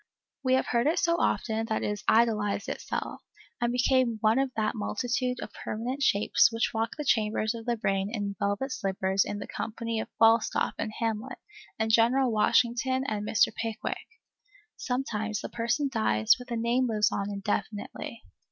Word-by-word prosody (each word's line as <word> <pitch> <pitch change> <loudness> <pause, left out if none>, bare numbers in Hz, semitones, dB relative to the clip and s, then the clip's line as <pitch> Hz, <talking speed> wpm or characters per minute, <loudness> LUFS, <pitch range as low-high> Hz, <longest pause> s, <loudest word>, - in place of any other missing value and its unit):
We 260 -1 +3
have 260 - +1
heard 235 +2 +1
it 320 - +2
so 335 0 +2
often, 225 -1 0
that 220 - -1
it - - 0
has 210 -1 -4
idealized 210 -3 +2
itself, - - -4 0.4
and 240 0 +1
become 250 -1 +2
one 220 +3 +4
of 270 -1 0
that 215 -1 0
multitude 250 +3 -2
of - - -7
permanent 245 +6 -4
shapes 210 -2 +4
which 225 0 0
walk 225 0 -1
the 300 - -4
chambers 220 -2 +1
of 230 0 -8
the 240 -1 +1
brain 195 -2 0
in 205 -3 -3
velvet 205 +7 -1
slippers 190 -2 0
in 205 - -4
the 205 - -6
company 230 0 -4
of - - -5
Falstaff 225 0 +3
and 215 - -2
Hamlet 225 -2 -2 0.4
and 220 0 0
General 240 +3 +4
Washington 240 +4 +2
and 210 -1 -2
Mr. 215 - +3
Pickwick. 225 -1 -4 0.7
Sometimes 220 -5 -2
the - - -6
person 240 +5 0
dies, 165 - +3
but 250 0 -11
the 235 -2 -3
name 240 +3 +1
lives 215 -2 +2
on 200 +1 -2
indefinitely. 205 +3 -4
225 Hz, 170 wpm, -28 LUFS, 210-245 Hz, 0.7 s, one